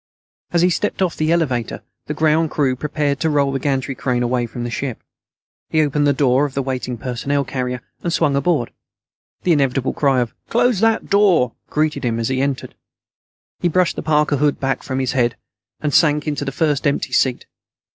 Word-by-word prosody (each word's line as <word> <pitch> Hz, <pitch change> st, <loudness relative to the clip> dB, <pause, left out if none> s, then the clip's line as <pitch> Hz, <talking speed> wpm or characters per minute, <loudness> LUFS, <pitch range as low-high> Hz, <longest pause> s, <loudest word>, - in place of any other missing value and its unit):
As 170 Hz, -1 st, +2 dB
he 180 Hz, -, +4 dB
stepped 195 Hz, +1 st, 0 dB
off 175 Hz, -3 st, -1 dB
the 155 Hz, +1 st, 0 dB
elevator, 135 Hz, -9 st, -1 dB, 0.2 s
the 150 Hz, -, -3 dB
ground 155 Hz, +1 st, +2 dB
crew 135 Hz, -4 st, +1 dB
prepared 145 Hz, +1 st, -1 dB
to 160 Hz, -, +1 dB
roll 140 Hz, -2 st, +2 dB
the 135 Hz, -, -2 dB
gantry 135 Hz, -1 st, -1 dB
crane 125 Hz, -1 st, -1 dB
away 120 Hz, 0 st, 0 dB
from 120 Hz, +1 st, -6 dB
the 120 Hz, -, -4 dB
ship. 130 Hz, -1 st, -4 dB, 0.7 s
He 155 Hz, -1 st, +3 dB
opened 145 Hz, 0 st, +1 dB
the -, -, +5 dB
door 135 Hz, -1 st, +3 dB
of 140 Hz, -, -6 dB
the 135 Hz, -, 0 dB
waiting 125 Hz, -2 st, -3 dB
personnel 130 Hz, +4 st, -1 dB
carrier 125 Hz, -1 st, -3 dB, 0.2 s
and 170 Hz, -, -2 dB
swung 140 Hz, -3 st, +2 dB
aboard. 140 Hz, -3 st, +1 dB, 0.7 s
The 180 Hz, -, +2 dB
inevitable 135 Hz, -3 st, +1 dB
cry 135 Hz, -3 st, +2 dB
of 120 Hz, -, -3 dB, 0.2 s
"close 240 Hz, -3 st, +2 dB
that 225 Hz, 0 st, +1 dB
door" 185 Hz, -, +4 dB, 0.2 s
greeted 155 Hz, -1 st, 0 dB
him 115 Hz, -2 st, 0 dB
as 115 Hz, -, -1 dB
he 130 Hz, 0 st, 0 dB
entered. 140 Hz, -1 st, -2 dB, 0.9 s
He 175 Hz, -, +1 dB
brushed 180 Hz, +1 st, +2 dB
the -, -, -4 dB
parka 150 Hz, -1 st, +2 dB
hood 145 Hz, +1 st, +1 dB
back 135 Hz, -1 st, -1 dB
from 130 Hz, -, -4 dB
his 130 Hz, -1 st, 0 dB
head, 120 Hz, -3 st, +1 dB, 0.5 s
and 150 Hz, -2 st, -1 dB
sank 150 Hz, -2 st, +3 dB
into 145 Hz, -1 st, -2 dB
the 135 Hz, -, -2 dB
first 150 Hz, 0 st, 0 dB
empty 140 Hz, -, -1 dB
seat. 130 Hz, -2 st, +1 dB
140 Hz, 195 wpm, -20 LUFS, 130-155 Hz, 0.9 s, the